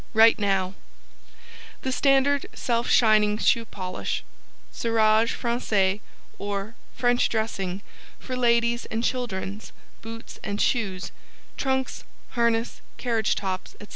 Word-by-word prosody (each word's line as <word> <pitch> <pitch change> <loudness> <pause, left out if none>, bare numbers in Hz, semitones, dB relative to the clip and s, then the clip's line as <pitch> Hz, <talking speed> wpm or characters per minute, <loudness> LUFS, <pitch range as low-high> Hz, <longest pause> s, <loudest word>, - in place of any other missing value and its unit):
WRITE 225 +1 +7
NOW 195 -2 +1 1.1
THE 260 - -1
STANDARD 275 +1 +3
SELF 235 -1 0
SHINING 215 -2 +5
SHOE 230 +1 +2
POLISH 185 -3 -4 0.5
Cirage 225 -1 +3
Francais 210 -5 +1 0.4
Or 200 +1 -3 0.2
French 245 0 +2
Dressing 200 -4 -2 0.3
For 255 - -5
Ladies 235 -1 +2
and 225 +1 -2
Children's 215 -5 -3 0.3
Boots 225 0 -9
& - - -1
Shoes 195 -6 0 0.4
Trunks, 265 -1 -1 0.3
Harness, 235 -1 0 0.2
Carriage 225 -4 +1
Tops, 190 -2 -4
&c. - - -9
225 Hz, 105 wpm, -25 LUFS, 205-240 Hz, 1.1 s, WRITE